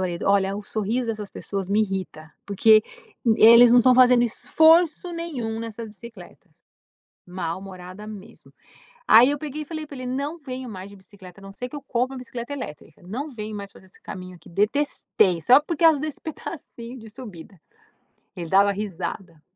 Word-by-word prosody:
marido: 175 -2 -3
"Olha, 195 0 +2
o 210 - -6
sorriso 220 +4 -2
dessas 215 -3 -4
pessoas 195 -2 -5
me 205 +2 +2
irrita 185 -6 -5
porque 215 +2 +5 0.4
e 220 -1 +4
eles 235 +1 +9
não 245 - +7
estão 250 +1 +5
fazendo 250 -1 +6
esforço 320 +8 +3
nenhum 265 -10 -4
nessas 230 0 -7
bicicletas." 215 -3 -14 0.7
Mal-humorada 185 +2 -7
mesmo. 215 0 -12 0.5
Aí 235 +4 +8
eu 290 - -2
peguei 305 0 -6
e - - -15
falei 315 0 -6
pra 285 - -10
ele: 255 - -6
"Não 280 +6 -3
venho 260 -3 -7
mais 190 -2 -8
de 200 - -14
bicicleta 190 -1 -15
a - - -15
não 195 0 -11
ser 250 +4 -6
que 295 - -9
eu 290 - -6
compre 255 0 -1
uma - - -6
bicicleta 250 +1 -7
elétrica." 255 - -8
E - - -26
falei: 175 - -18
"Não 280 +7 -4
venho 215 -4 -7
mais 200 -1 -7
fazer 190 - -17
esse 185 - -20
caminho 185 -1 -9
aqui - - -17
detestei! 210 - +1
Só 250 - +6
por 320 +1 -4
causa 320 -3 +4
desse 310 -1 -5
pedacinho 260 -6 -8
de 220 -1 -12
subida." 205 -6 -11 0.8
Ele 170 -3 -6
dava 200 +2 +4
risada. 185 -4 -6
220 Hz, 185 wpm, -23 LUFS, 195-255 Hz, 0.8 s, eles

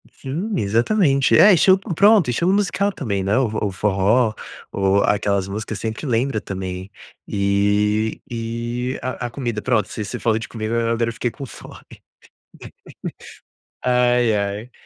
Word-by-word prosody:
Sim, 160 +11 -5
exatamente. 135 - +2
É, 205 0 +8
esti 180 +2 +4
p 195 -1 -6
pronto, 200 - +5
estilo 170 +10 +1
musical 200 0 +1
também, 100 - -3
né, 100 +5 +1
o 130 -2 +2
f 110 - -7
o 105 - -1
forró, 105 +4 +2 0.4
ou 100 0 +2
aquelas 100 -2 +1
músicas 105 +2 -5
sempre 110 +6 -4
lembra 120 -1 0
também. 95 -1 -6 0.4
E 105 +2 +1
e 120 +2 -3
a 125 -1 -4
a - - -8
comida, 120 -4 -4
pronto, 110 -5 +1
ce 110 - -5
você - - -6
falou 115 -2 +1
de 115 - -7
comida, 110 0 -4
a - - +1
agora 115 0 0
eu - - -5
fiquei 120 - -2
com 140 +4 -8
fome. - - -12 2.0
Ai, 125 -2 +3
ai. 100 +4 -3
115 Hz, 160 wpm, -21 LUFS, 105-130 Hz, 2.0 s, É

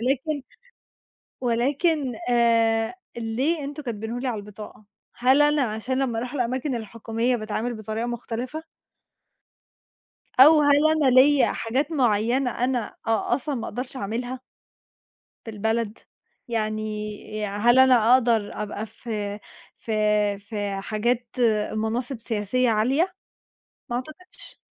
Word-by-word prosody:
ولكن 270 +4 -1 1.0
ولكن 265 +3 +1
آآ 230 +2 +3 0.2
ليه 265 +8 -1
أنتم 290 +1 -6
كاتبينُه 230 0 -4
لي 260 - -3
على 225 -4 -2
البطاقة؟ 210 +1 -11 0.3
هل 260 +4 +4
أنا 295 0 +3
عشان 230 +4 -2
لمّا 240 -4 0
أروح 250 +3 -5
الأماكن 255 +1 -1
الحكومية 230 +2 -2
باتعامل 220 +2 -3
بطريقة 220 +1 -4
مُختلفة؟ 245 +6 -5 1.8
أو 300 +3 +9
هل 290 +1 +5
أنا 305 -4 +3
ليَّ 265 +2 +5
حاجات 265 +7 -1
معينة 245 -1 +2
أنا 250 -1 -1 0.2
أ 225 -1 +1
أصلًا 285 0 -3
ما 235 - -4
أقدرش 255 +2 -5
أعملها؟ 245 +5 -4 1.1
في 225 - -6
البلد، 220 +1 -1 0.5
يعني 215 -2 -1 0.6
ي - - 0
هل 235 +6 +3
أنا 250 -3 +6
أقدر 230 -5 +2
أبقى 210 +1 -5
في 210 -1 -5 0.4
في 225 - -7 0.5
في 205 -2 -4
حاجات 235 +4 -1 0.4
مناصب 230 +3 -2
سياسية 230 +4 0
عالية؟ 270 - +1 0.8
ما 240 - 0
أعتقدش. 310 +8 -9
240 Hz, 115 wpm, -24 LUFS, 220-265 Hz, 1.8 s, أو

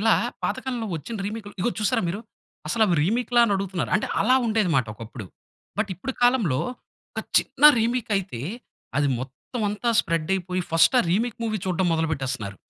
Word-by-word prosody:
ఇలా, 225 +1 +5 0.3
పాతకాలంలో 245 -4 -2
వచ్చిన 225 +9 -6
రీమేక్‌లు 210 -1 -6
ఇదిగో 240 +7 +1
చూసారా 225 +1 +1
మీరు? 200 +5 -3 0.5
అసలు 225 -2 +3 0.2
రీమేక్‌లా? 240 +6 +2
అని 205 - +1
అడుగుతున్నారు. 190 -2 -3
అంటే 210 - -2
అలా 255 +5 +4
ఉండేదిమాట 180 - +2
ఒకప్పుడు. 110 -2 -9 0.5
బట్, 210 -1 +1
ఇప్పుడు 250 +10 -5
కాలంలో, 225 - +3 0.5
ఒక - - -3 0.2
చిన్న 280 - -1
రీమేక్ 235 0 0
అయితే, 185 -11 -4 0.6
అది 145 -1 +2
మొత్తం 135 - -7
అంతా 210 +3 -1
స్ప్రెడ్ 165 0 -2
అయిపోయి, 185 0 -2
ఫస్ట్ 165 +9 +5
ఆ - - +1
రీమేక్ 225 +5 0
మూవీ 215 -2 -1
చూడడం 185 0 +1
మొదలు 160 0 +1
పెట్టేస్తున్నారు. 130 -8 -3
200 Hz, 160 wpm, -24 LUFS, 160-230 Hz, 0.6 s, ఇలా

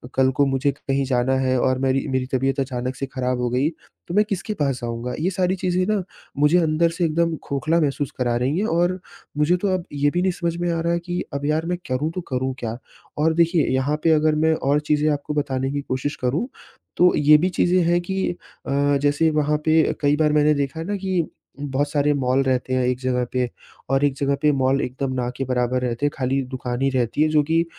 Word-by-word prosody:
कल 130 0 +3
को 145 - +4
मुझे 135 +1 +1
कहीं 135 0 -2
जाना 130 0 +1
है 130 -1 +1
और 130 +1 +1
मेरी 135 0 0
मेरी 130 -1 -1
तबीयत 135 +1 +1
अचानक 130 -1 -3
से 135 - -3
खराब 125 -1 -2
हो 125 - 0
गई, 130 +5 +1 0.4
तो 170 - -5
मैं 210 - +5
किसके 200 +2 -2
पास 135 -3 0
जाऊँगा? 120 +1 -4
ये 170 +4 +1
सारी 185 0 0
चीज़ें 185 0 0
ना 215 -2 +1 0.4
मुझे 150 +4 +4
अंदर 165 0 +2
से 170 +1 -1
एकदम 165 +1 +1
खोखला 155 +4 0
महसूस 145 -1 -1
करा 120 -2 0
रही 130 +6 0
हैं 210 - 0
और 175 +1 +1 0.4
मुझे 150 +4 +3
तो 205 - +1
अब 180 -2 -2
ये 145 0 +2
भी 175 - 0
नहीं 185 0 +2
समझ 170 -1 -2
में 175 0 -1
आ 165 - -1
रहा 170 +1 0
है 170 - 0
कि 175 +1 -4
अब 140 0 -3
यार, 155 +2 0
मैं 180 +1 -1
करूँ 135 +5 -1
तो 180 - -2
करूँ 130 0 -1
क्या? 115 0 -4 0.4
और 160 +2 +2
देखिए, 170 0 +2
यहाँ 135 +3 0
पे 165 - +4
अगर 155 0 +3
मैं 160 +1 +3
और 145 0 +1
चीज़ें 150 0 +1
आपको 145 0 -3
बताने 135 -2 -1
की 145 0 -2
कोशिश 135 +2 -3
करूँ, 135 - 0 0.5
तो 180 0 +5
ये 150 +1 +6
भी 180 +4 +1
चीज़ें 180 0 +2
हैं 175 0 +3
कि 190 +2 -2 0.4
अ, 140 +1 +2
जैसे 145 +3 +2
वहाँ 150 0 +1
पे 160 0 +3
कई 145 0 +3
बार 150 -1 +3
मैंने 150 0 +4
देखा 140 +1 -2
है 165 - -4
ना 205 +3 -2
कि 185 -3 -1 0.3
बहुत 145 0 -1
सारे 145 0 +2
मॉल 135 -1 +1
रहते 130 -1 0
हैं, 130 0 +2
एक 125 0 0
जगह 125 -1 0
पे 125 -1 0 0.4
और 135 +1 +2
एक 140 - +1
जगह 140 0 +1
पे 150 -1 +4
मॉल 135 +1 +2
एकदम 130 +1 -3
ना 120 - -2
के 135 - -1
बराबर 125 0 0
रहते 125 +2 -2
हैं, 145 - +1
खाली 135 +1 0
दुकान 125 0 -4
ही 135 - +3
रहती 120 +4 0
है, 155 - +2
जो 150 -1 +3
कि 165 +2 +1
145 Hz, 235 wpm, -22 LUFS, 130-165 Hz, 0.5 s, ये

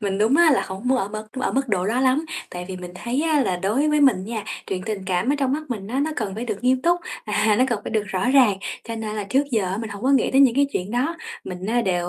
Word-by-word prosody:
mình 195 -2 -1
đúng 225 +6 +3
á 340 -1 +6
là 270 - +3
hổng 190 +1 -7
muốn 260 0 +3
ở 195 - -1
mức 215 +1 -6
ở - - 0
mức 270 0 0
độ 190 -3 0
đó 235 +5 +1
lắm, 265 +4 +2 0.3
tại 180 0 -6
vì 190 - -5
mình 180 -1 -8
thấy 245 +9 -2
á 315 -2 +2
là 190 -9 0
đối 215 +12 +1
với 300 0 +2
mình 245 -10 +4
nha, 220 -1 -4 0.2
chuyện 185 -1 -3
tình 210 -3 -3
cảm 190 +8 +1
ở - - +1
trong 270 -2 +1
mắt 305 +3 -1
mình 205 -5 -4
á, 260 +4 -1
nó 315 - -2
cần 205 -5 -3
phải 225 +3 -4
được 215 -1 -5
nghiêm 255 0 +3
túc, 350 +1 +2 0.2
à, 210 0 +2
nó 255 - +5
cần 235 -4 -1
phải - - -4
được 215 - +1
rõ 190 +5 -1
ràng, 250 -8 +5 0.3
cho 230 - -5
nên 215 -1 -4
là 210 - -2
trước 260 +8 +2
giờ 225 -4 +1
á 185 +1 -2
mình 225 -2 -5
hổng 200 +1 -8
có 260 - +2
nghĩ 275 - +3
tới 270 - +4
những 260 -4 +6
cái 280 +1 +3
chuyện 185 +3 -3
đó. 265 +8 0 0.3
Mình 180 0 -6
á 240 +3 +2
đều 175 -4 0
225 Hz, 310 wpm, -23 LUFS, 195-265 Hz, 0.3 s, á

